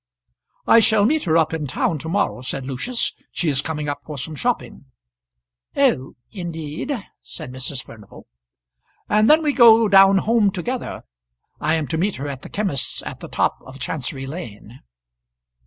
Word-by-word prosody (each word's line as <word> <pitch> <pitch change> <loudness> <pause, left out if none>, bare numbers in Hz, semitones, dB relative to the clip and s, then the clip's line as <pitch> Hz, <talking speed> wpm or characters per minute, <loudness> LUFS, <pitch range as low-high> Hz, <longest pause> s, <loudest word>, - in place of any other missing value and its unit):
"I 230 - +7
shall 215 -2 +4
meet 305 +3 +1
her 165 -1 +3
up 160 -1 +2
in 155 -3 -2
town 150 +4 -1
to 160 - -6
morrow," 195 -8 0
said 130 +1 -4
Lucius. 185 - -2 0.2
"She 170 - -1
is 140 -1 +1
coming 150 0 -4
up 145 0 -4
for 150 -2 -7
some 155 +4 -5
shopping." 235 - -3 0.9
"Oh! 130 +1 +2 0.2
indeed," 165 - -5 0.3
said 155 -6 -8
Mrs. 130 +1 -5
Furnival. 105 -3 -14 0.8
"And 215 +1 +3
then 315 +2 +6
we 295 -2 +1
go 230 -3 +7
down 195 -1 +7
home 220 +1 +3
together. 225 +7 -4 0.6
I 155 +2 +1
am 160 -2 -1
to 160 - -1
meet 195 +3 0
her 140 - -5
at 135 -2 -6
the - - -10
chymist's 195 -10 -2
at - - -7
the - - -8
top - - 0
of 130 +1 -12
Chancery 135 -1 -3
Lane." 125 - -9
160 Hz, 170 wpm, -21 LUFS, 140-210 Hz, 0.9 s, I